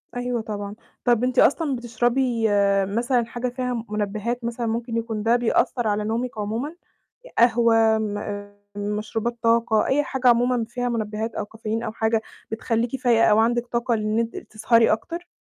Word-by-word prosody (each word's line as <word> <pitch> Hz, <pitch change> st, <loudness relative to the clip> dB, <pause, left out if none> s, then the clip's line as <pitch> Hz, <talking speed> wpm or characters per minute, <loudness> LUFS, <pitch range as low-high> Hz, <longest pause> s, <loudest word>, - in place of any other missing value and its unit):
أيوه 245 Hz, -1 st, -2 dB
طبعًا. 205 Hz, -1 st, -5 dB, 0.3 s
طَب 240 Hz, -1 st, +3 dB
أنتِ 255 Hz, 0 st, +1 dB
أصلًا 285 Hz, -1 st, +3 dB
بتشربي 240 Hz, 0 st, 0 dB, 0.4 s
مثلًا 235 Hz, +4 st, 0 dB
حاجة 240 Hz, +2 st, -4 dB
فيها 250 Hz, -2 st, -3 dB
منبّهات 215 Hz, +3 st, -2 dB
مثلًا 235 Hz, 0 st, -3 dB
ممكن 230 Hz, +1 st, -2 dB
يكون 225 Hz, -2 st, -3 dB
ده 230 Hz, +2 st, +4 dB
بيأثّر 240 Hz, 0 st, +1 dB
على 210 Hz, 0 st, 0 dB
نومِك 230 Hz, +2 st, -2 dB
عمومًا؟ 225 Hz, +10 st, -3 dB, 0.6 s
قهوة، 225 Hz, -1 st, +4 dB
م 205 Hz, -1 st, -4 dB, 0.2 s
مشروبات 215 Hz, +3 st, -3 dB
طاقة، 230 Hz, -1 st, +3 dB
أي 290 Hz, +2 st, +2 dB
حاجة 260 Hz, -2 st, -1 dB
عمومًا 240 Hz, -1 st, +3 dB
فيها 245 Hz, 0 st, -2 dB
منبّهات 220 Hz, -1 st, -3 dB
أو 210 Hz, -, -2 dB
كافيين 220 Hz, +1 st, -4 dB
أو 220 Hz, -, -3 dB
حاجة 220 Hz, 0 st, 0 dB, 0.3 s
بتخلّيكِ 230 Hz, +2 st, -1 dB
فايقة 235 Hz, -3 st, +4 dB
أو 210 Hz, -, +5 dB
عندِك 240 Hz, +2 st, +2 dB
طاقة 235 Hz, 0 st, 0 dB
لإن 215 Hz, 0 st, 0 dB
أنتِ 230 Hz, 0 st, -2 dB
تسهري 225 Hz, +1 st, +2 dB
أكتر؟ 335 Hz, +11 st, -3 dB
230 Hz, 155 wpm, -23 LUFS, 220-245 Hz, 0.6 s, أو